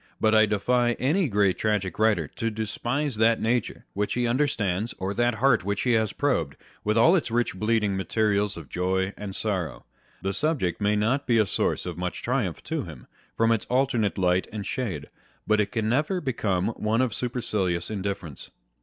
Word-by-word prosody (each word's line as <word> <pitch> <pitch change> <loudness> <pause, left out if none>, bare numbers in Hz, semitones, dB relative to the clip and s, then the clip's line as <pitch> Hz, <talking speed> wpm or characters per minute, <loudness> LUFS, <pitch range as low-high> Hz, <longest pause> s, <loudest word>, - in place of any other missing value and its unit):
But 110 0 +3
I 110 0 +6
defy 120 +4 +2
any 150 +7 +1
great 100 -3 +2
tragic 105 -4 -1
writer 110 -1 +3
to 115 - -2
despise 120 +5 -2
that 115 +1 +4
nature 115 0 -1
which 105 +1 -1
he 125 0 +1
understands, 115 -5 0
or 95 +2 -2
that 120 +1 +1
heart 130 +1 +3
which 100 +1 -1
he 125 - +2
has 110 -3 +2
probed, 85 - -1 0.3
with 105 +2 +1
all 160 +11 +6
its 165 - 0
rich 120 +1 0
bleeding 105 0 +1
materials 105 0 0
of 80 -4 -9
joy 95 +4 -1
and 100 -2 -6
sorrow. 95 - -2 0.4
The 95 +1 -1
subject 120 - 0
may 105 +1 +2
not 115 +7 0
be 120 -2 +3
a 110 - +4
source - - -1
of 90 -2 -5
much 90 0 -4
triumph 120 - -1
to - - -2
him, - - -10 0.3
from 115 0 +3
its 115 -2 +1
alternate 125 -5 +1
light 90 0 +2
and 105 -2 -5
shade, 95 - -3 0.4
but 110 0 +3
it 100 - -2
can 110 -3 -1
never 150 - +1
become 105 - -1
one 110 +1 0
of 120 -5 -1
supercilious 105 -8 -1
indifference. 95 -7 -5
110 Hz, 185 wpm, -26 LUFS, 95-120 Hz, 0.4 s, I